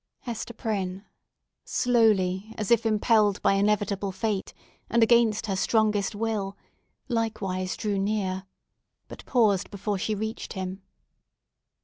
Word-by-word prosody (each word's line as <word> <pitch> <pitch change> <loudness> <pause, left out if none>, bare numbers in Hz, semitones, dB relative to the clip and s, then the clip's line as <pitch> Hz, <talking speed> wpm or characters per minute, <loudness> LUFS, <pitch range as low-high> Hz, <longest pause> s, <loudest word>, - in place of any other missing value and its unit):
Hester 235 -1 -5
Prynne—slowly, 205 0 -1
as 215 -1 -3
if 230 -1 +4
impelled 215 -2 +3
by - - +4
inevitable 200 -1 +1
fate, 195 +1 -2 0.4
and 235 +1 +4
against 225 -2 +4
her 195 -3 -1
strongest 210 0 +1
will—likewise 205 -2 -3
drew 205 -3 -1
near, 195 -2 -1 0.6
but - - -10
paused 215 -7 +2
before 200 0 -3
she 215 +2 -1
reached 220 +2 -4
him. 190 0 -5
210 Hz, 105 wpm, -27 LUFS, 195-225 Hz, 0.6 s, if